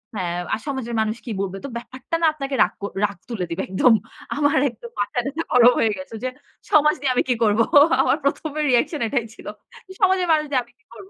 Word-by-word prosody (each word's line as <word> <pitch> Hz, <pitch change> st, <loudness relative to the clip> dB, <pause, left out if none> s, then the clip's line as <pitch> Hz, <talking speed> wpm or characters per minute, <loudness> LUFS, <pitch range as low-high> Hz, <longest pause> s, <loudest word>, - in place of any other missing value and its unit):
হ্যাঁ, 175 Hz, -3 st, -2 dB, 0.2 s
আর -, -, -1 dB
সমাজের 255 Hz, -4 st, -3 dB
মানুষ 220 Hz, +1 st, -1 dB
কি 235 Hz, -, -5 dB
বলবে? 195 Hz, 0 st, -4 dB
তো -, -, -5 dB
ব্যাপারটা 260 Hz, +6 st, -6 dB
না -, -, +3 dB
আপনাকে 275 Hz, -2 st, -4 dB
রাগ -, -, -2 dB
কর 200 Hz, -, -4 dB
রাগ 200 Hz, -3 st, -5 dB
তুলে 200 Hz, -7 st, -3 dB
দিবে। 170 Hz, +3 st, -3 dB
একদম। 225 Hz, +5 st, +4 dB, 0.4 s
আমার 290 Hz, +1 st, +2 dB
একদম 235 Hz, 0 st, -12 dB
মাথা-টাথা 265 Hz, +10 st, -2 dB
গরম 245 Hz, 0 st, +7 dB
হয়ে 220 Hz, -, +2 dB
গেছে 185 Hz, +4 st, -9 dB
যে, 255 Hz, -, 0 dB, 0.4 s
সমাজ 300 Hz, 0 st, +5 dB
দিয়ে 265 Hz, -2 st, +1 dB
আমি -, -, +3 dB
কি 245 Hz, -, +3 dB
করব? 210 Hz, +1 st, +2 dB, 0.4 s
আমার 280 Hz, -, +2 dB
১ম, 305 Hz, +2 st, -1 dB, 0.2 s
রিঅ্যাকশন 255 Hz, +4 st, +1 dB
এটাই 240 Hz, -2 st, -1 dB
ছিল। -, -, -14 dB, 0.6 s
সমাজের 375 Hz, -2 st, +3 dB
মানুষ 305 Hz, -1 st, +3 dB
দিয়ে 255 Hz, -2 st, +2 dB
আমি 240 Hz, -, -25 dB
কি -, -, -35 dB
করব? 200 Hz, -4 st, -13 dB
245 Hz, 210 wpm, -22 LUFS, 215-285 Hz, 0.6 s, গরম